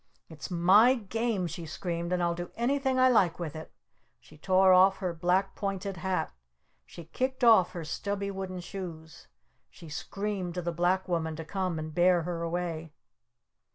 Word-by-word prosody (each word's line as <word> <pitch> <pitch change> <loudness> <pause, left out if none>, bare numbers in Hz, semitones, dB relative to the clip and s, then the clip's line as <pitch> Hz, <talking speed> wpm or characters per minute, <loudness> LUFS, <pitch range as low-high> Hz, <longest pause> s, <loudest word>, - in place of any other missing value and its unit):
"It's 155 -4 -8
my 190 +8 +5
Game!" 225 -3 -2
she 165 0 -6
screamed. 170 +1 -4
"And 180 -1 +1
I'll 170 0 +1
do 175 +1 -6
anything 265 +2 0
I 255 0 +5
like 200 -9 +3
with 165 -4 -5
it!" 155 - -8 0.5
She 155 - -18
tore 185 +4 +4
off 190 +1 +5
her 185 -3 -3
black 180 +4 +1
pointed 195 -1 -4
hat! 185 - -2 0.5
She 170 - -11
kicked 260 - -3
off 220 -7 +6
her 170 -3 -6
stubby 200 +5 -3
wooden 190 -2 -5
shoes! 170 -3 -9 0.4
She 165 - -13
screamed 190 +3 -4
to 180 - -3
the 170 - -1
Black 180 +3 0
Woman 160 -3 -1
to 160 0 -7
come 185 -1 -2
and 155 0 -5
bear 175 0 +3
her 170 0 -4
away! 165 -2 -3
180 Hz, 170 wpm, -29 LUFS, 170-195 Hz, 0.5 s, off